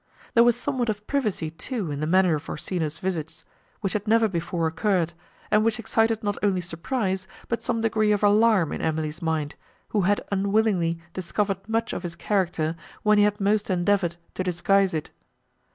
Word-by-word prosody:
There 235 - +7
was 240 -1 +4
somewhat 245 -1 -1
of 210 -1 -3
privacy, 210 - -1
too, 195 - -4
in 145 - -3
the 155 - -1
manner 185 0 +4
of 150 0 -4
Orsino's 155 -1 -3
visits, 165 -5 -4 0.4
which 195 -3 -1
had 210 0 -2
never 225 +1 +4
before 170 -2 -2
occurred, 170 0 +1 0.4
and 215 0 +4
which 225 -1 +1
excited 225 -1 +1
not 205 -1 -1
only 195 -3 +2
surprise, 190 +2 -2 0.2
but 235 - -2
some 230 -2 -1
degree 215 -1 +2
of 210 0 +1
alarm 205 -4 +4
in - - -4
Emily's 155 +1 -2
mind, 160 -2 -1 0.4
who 210 - +1
had 200 +3 +1
unwillingly 195 -4 +1 0.2
discovered 195 +2 -2
much 225 +1 0
of - - -3
his 175 -2 -6
character 170 -5 0 0.3
when 210 0 +5
he - - +6
had 210 0 0
most 205 +1 +1
endeavoured 180 -1 +1 0.2
to 185 - -2
disguise 185 +1 +2
it. 155 - -4
195 Hz, 180 wpm, -25 LUFS, 170-215 Hz, 0.4 s, There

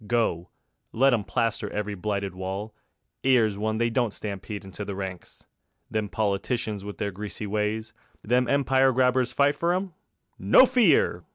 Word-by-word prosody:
Go, 105 -8 0 0.4
let 135 +3 +3
'em 110 -4 +1
plaster 115 0 -1
every 105 0 -3
blighted 100 0 -3
wall, 95 +3 -5 0.5
'Ere's 120 -6 +3
ONE 110 +2 -2
they 115 +1 +1
don't 120 -2 +1
stampede 100 0 -6
into 95 +2 -7
the 100 -1 -5
ranks. 95 -2 -7 0.5
Them 110 -2 -1
politicians 105 0 -2
with 105 0 -7
their 100 - -2
greasy 105 +2 -6
ways; 105 +2 -2 0.3
Them 125 +2 +2
empire 135 -1 +3
grabbers 125 0 +2
fight 140 +1 +2
for 170 +1 +1
'em? 185 -1 -3 0.5
No 100 - +7
fear! 170 - +3
110 Hz, 155 wpm, -26 LUFS, 100-125 Hz, 0.5 s, No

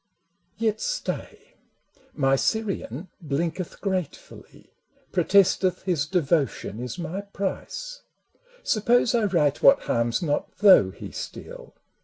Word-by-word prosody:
Yet 220 -1 0
stay: 465 -2 -4 0.6
my 135 -2 +3
Syrian 190 - -2
blinketh 165 +4 -3
gratefully, 185 -6 -5 0.4
Protesteth 190 0 +3
his 165 -6 0
devotion 145 - 0
is 125 +6 -5
my 175 +3 -4
price 200 - -5 0.3
— - - -31
Suppose 235 +2 +2
I 230 -3 +2
write 155 -7 +1
what 275 - +6
harms 115 +7 0
not, 145 -3 -2
though 190 - +7
he - - -9
steal? - - -9
185 Hz, 110 wpm, -25 LUFS, 150-215 Hz, 0.6 s, though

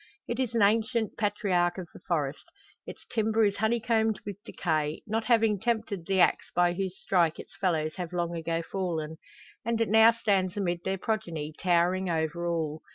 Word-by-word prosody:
It 240 +1 -3
is 245 -3 -1
an 225 - +4
ancient 225 +2 +1
patriarch 190 -4 +1
of 185 -2 -6
the - - -12
forest; 150 -5 -2 0.4
its - - -10
timber 220 0 +2
is 200 -1 0
honeycombed 220 -1 +1
with 205 0 -7
decay, 155 -3 -2
not 220 +1 -2
having 225 -4 +3
tempted 215 -6 -2
the 195 -1 +1
axe - - +3
by 175 0 +3
whose 190 0 -3
stroke 170 -4 +1
its - - -11
fellows 160 -5 0
have 180 -2 -4
long 170 -1 -2
ago 165 0 -2
fallen, 165 -4 -3 0.5
and 230 0 -1
it 230 - +1
now 220 +1 +7
stands 200 -5 0
amid 175 -4 -1
their 190 0 0
progeny, 170 -8 -3
towering 180 +2 +1
over 165 +1 -1
all. 160 -2 -2
190 Hz, 175 wpm, -28 LUFS, 170-220 Hz, 0.5 s, now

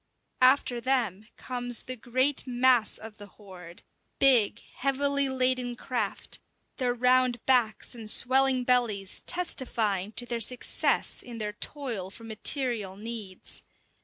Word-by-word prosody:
After 255 -2 +4
them 230 -6 -1
comes 245 -2 -1
the 255 - -4
great 255 +4 0
mass 245 -2 +3
of 220 0 -12
the 205 - -10
horde, 180 -4 -13 0.3
big, 250 -7 +4 0.2
heavily 280 +1 +1
laden 255 -1 0
craft, 235 -4 -3 0.4
their 245 -2 0
round 250 -1 +2
backs 245 -4 +2
and 225 -3 -8
swelling 260 +3 +3
bellies 230 -6 +1
testifying 220 - -1
to 245 - -2
their 235 -1 -3
success 250 +3 +1
in 240 -2 -9
their 210 -1 -3
toil 230 -6 -3
for 230 - -12
material 225 -3 -1
needs. 215 -3 -4
245 Hz, 125 wpm, -28 LUFS, 215-255 Hz, 0.4 s, After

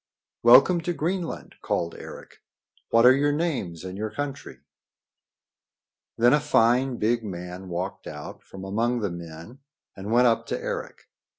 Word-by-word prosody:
"Welcome 135 +9 +6
to 175 +2 -2
Greenland!" 170 +2 -4
called 85 0 -2
Eric. - - -11 0.5
"What 115 +1 +4
are 125 - +9
your 145 +1 +2
names 145 - -2
and 95 +1 -7
your 110 +1 -2
country?" 145 +2 -6 1.6
Then 120 +3 +5
a 150 - +5
fine, 125 -3 +2
big 115 +2 0
man 90 -1 -7
walked 90 +3 -5
out 75 -1 -8
from 95 0 -11
among 115 +5 0
the 100 -4 -1
men 85 +8 -10 0.4
and 100 +2 -6
went 120 +2 +5
up 115 -1 +2
to - - -2
Eric. - - -5
115 Hz, 150 wpm, -25 LUFS, 95-135 Hz, 1.6 s, are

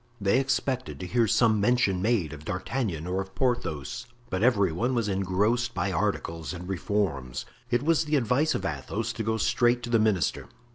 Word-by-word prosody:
They 100 +4 +3
expected 130 -1 -1
to 90 - -5
hear 115 +5 +2
some 110 -1 +3
mention 105 -5 +2
made 100 -8 +1
of 75 0 -10
D'Artagnan 90 - -3
or 90 +2 -1
of 95 0 -10
Porthos, 120 - -2 0.2
but 95 - -1
every 105 -7 +3
one 120 +10 0
was 115 -3 0
engrossed 105 +5 0
by 100 - 0
articles 80 0 -2
and 90 +1 -8
reforms. 85 -10 -2 0.2
It 120 +2 +1
was 160 +1 +2
the 150 0 +1
advice 140 +4 +2
of 95 - -3
Athos 70 -7 -3
to 115 - -3
go 110 +1 0
straight 120 +1 +2
to 120 - -5
the 115 - +4
minister. 105 -8 +1
105 Hz, 185 wpm, -27 LUFS, 90-120 Hz, 0.2 s, the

